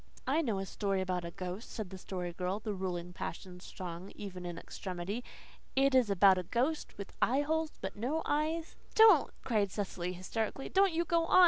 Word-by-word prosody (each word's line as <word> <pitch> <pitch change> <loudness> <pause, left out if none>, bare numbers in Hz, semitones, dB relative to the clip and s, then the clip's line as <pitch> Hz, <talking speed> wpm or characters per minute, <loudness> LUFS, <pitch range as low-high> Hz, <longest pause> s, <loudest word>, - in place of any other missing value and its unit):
"I 295 +5 +3
know 230 -10 0
a 195 - -2
story 195 0 -1
about 180 -2 -1
a - - -3
ghost," 185 +5 -6
said 215 -5 -5
the 190 - -6
Story 180 -2 -4
Girl, 180 +3 -2
the 215 -1 -3
ruling 180 -2 -3
passion 180 +2 -6
strong 180 0 -7
even 185 -3 -6
in 175 -1 -5
extremity. 185 +7 -5 0.5
"It 275 0 +4
is 255 -4 +5
about 195 -1 +6
a - - -3
ghost 255 - -1
with 200 - -7
eyeholes 305 +5 +2
but 190 0 -4
no 270 +10 -1
eyes 315 +2 0
" - - -27
"Don't," 435 -9 +8
cried 210 -5 +2
Cecily 185 -3 -3
hysterically. 220 +8 -3
"Don't 390 0 +4
you 335 +1 +1
go 335 +1 +2
on! 370 - +6
200 Hz, 195 wpm, -33 LUFS, 180-275 Hz, 0.5 s, Don't